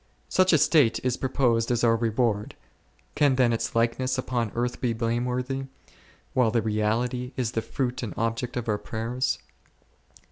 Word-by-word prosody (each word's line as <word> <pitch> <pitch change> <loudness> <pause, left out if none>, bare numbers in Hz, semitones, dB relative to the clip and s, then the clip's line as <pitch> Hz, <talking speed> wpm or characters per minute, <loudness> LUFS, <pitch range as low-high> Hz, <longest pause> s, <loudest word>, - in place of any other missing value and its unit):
Such 185 0 +4
a 160 - +6
state 145 -5 +4
is 125 -1 +2
proposed 120 -3 +1
as 120 -1 +1
our 115 -1 +5
reward; 115 -2 0 0.6
can 145 -3 +3
then 125 -2 +3
its 115 - -2
likeness 120 +3 +1
upon 120 -4 -1
earth 120 +1 -2
be 120 -2 +1
blameworthy, 125 +3 -1 0.7
while 125 -3 +3
the 115 -1 +1
reality 115 +4 -1
is 120 -3 -1
the 115 - -1
fruit 125 +1 -3
and 115 - -5
object 115 +2 -2
of 120 0 -3
our 105 -2 0
prayers 120 +3 -2
120 Hz, 155 wpm, -26 LUFS, 115-130 Hz, 0.7 s, a